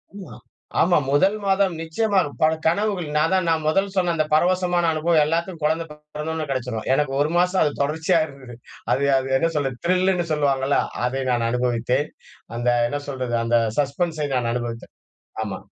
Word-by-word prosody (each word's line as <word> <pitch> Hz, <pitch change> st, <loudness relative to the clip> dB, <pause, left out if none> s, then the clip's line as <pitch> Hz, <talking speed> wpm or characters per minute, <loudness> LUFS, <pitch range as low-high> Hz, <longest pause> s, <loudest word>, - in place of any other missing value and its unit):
உ -, -, -8 dB, 0.2 s
ஆ -, -, -11 dB, 0.5 s
ஆமா 175 Hz, +1 st, +4 dB
1 190 Hz, +9 st, +3 dB
மாதம் 195 Hz, -2 st, +2 dB
நிச்சியமா 195 Hz, +5 st, +1 dB, 0.2 s
பல 155 Hz, 0 st, +4 dB
கனவுகள். 185 Hz, 0 st, +1 dB
நான் 150 Hz, -, +2 dB
தான் 185 Hz, -2 st, +1 dB
நான் 160 Hz, -1 st, +1 dB
முதல் 195 Hz, +6 st, +2 dB
சொன்ன 180 Hz, -2 st, +1 dB
அந்த 155 Hz, -1 st, +1 dB
பரவசமான 175 Hz, +1 st, +2 dB
அனுபவம் 160 Hz, 0 st, +2 dB
எல்லாத்துக்கும் 170 Hz, +2 st, -2 dB
குழந்தை 160 Hz, +2 st, +1 dB
பிறந்த 150 Hz, +1 st, -8 dB
உடனே 160 Hz, -1 st, -3 dB
கிடைச்சுரும். 125 Hz, -4 st, -3 dB
எனக்கு 135 Hz, 0 st, 0 dB
1 150 Hz, -, +1 dB
மாசம் 180 Hz, +1 st, +2 dB
அது 150 Hz, -, +1 dB
தொடர்ச்சியா 160 Hz, +4 st, +1 dB
இருந்தது. 135 Hz, -5 st, -12 dB, 0.4 s
அது 140 Hz, -, +1 dB
அது 135 Hz, 0 st, -2 dB
என்ன 165 Hz, +5 st, +1 dB
சொல்றது 135 Hz, -4 st, -1 dB
த்ரில்லுன்னு 185 Hz, 0 st, +2 dB
சொல்லுவாங்கல்ல 140 Hz, -2 st, +1 dB, 0.3 s
அதை 130 Hz, +2 st, -1 dB
நான் 120 Hz, -2 st, +1 dB
அனுபவித்தேன். 125 Hz, +3 st, 0 dB, 0.5 s
அந்த 120 Hz, +1 st, 0 dB, 0.2 s
என்ன 145 Hz, -, -2 dB
சொல்றது? 130 Hz, -3 st, -3 dB
அந்த 120 Hz, 0 st, +3 dB, 0.2 s
சஸ்பென்ஸை 150 Hz, +2 st, -1 dB
நான் 120 Hz, -2 st, 0 dB
அனுபவித்தேன். 120 Hz, -1 st, -5 dB, 0.5 s
ஆமா. -, -, -5 dB
155 Hz, 170 wpm, -22 LUFS, 135-175 Hz, 0.5 s, ஆமா